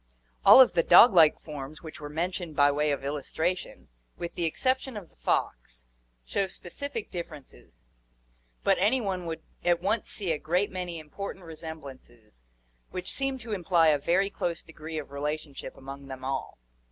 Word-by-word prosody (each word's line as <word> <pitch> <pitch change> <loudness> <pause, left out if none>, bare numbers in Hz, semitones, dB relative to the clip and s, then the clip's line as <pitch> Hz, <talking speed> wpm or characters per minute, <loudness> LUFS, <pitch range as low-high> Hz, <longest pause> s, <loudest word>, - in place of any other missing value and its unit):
All - - +10
of 260 - +8
the 170 - +4
dog 195 +7 +8
like 160 -4 +6
forms 150 0 -8
which 160 +1 -9
were 145 -1 -7
mentioned 170 +1 -3
by 145 0 +5
way 150 +1 +1
of 140 -1 -2
illustration, 160 +5 -3 0.3
with 170 - -5
the 170 - 0
exception 260 +7 0
of 185 -5 -9
the - - -30
fox, - - -2 0.4
show 195 - 0
specific 230 +6 -6
differences, 145 - -9 0.8
but - - +3
any 215 +8 +3
one 190 -6 -3
would 165 -1 -5 0.2
at 175 -1 +3
once 205 +5 -1
see 195 -5 -2
a 155 - -1
great 180 +5 0
many 180 -2 -4
important 180 +4 -7
resemblances 135 - -10 0.5
which 185 0 -2
seem 270 -1 0
to 230 -3 -6
imply 175 -4 +3
a 150 -2 +3
very 190 +7 +1
close 170 -3 -3
degree 160 0 -8
of 145 -2 -6
relationship 145 0 -5
among 135 +1 -9
them 130 -1 -8
all. 135 0 -3
165 Hz, 165 wpm, -28 LUFS, 145-185 Hz, 0.8 s, All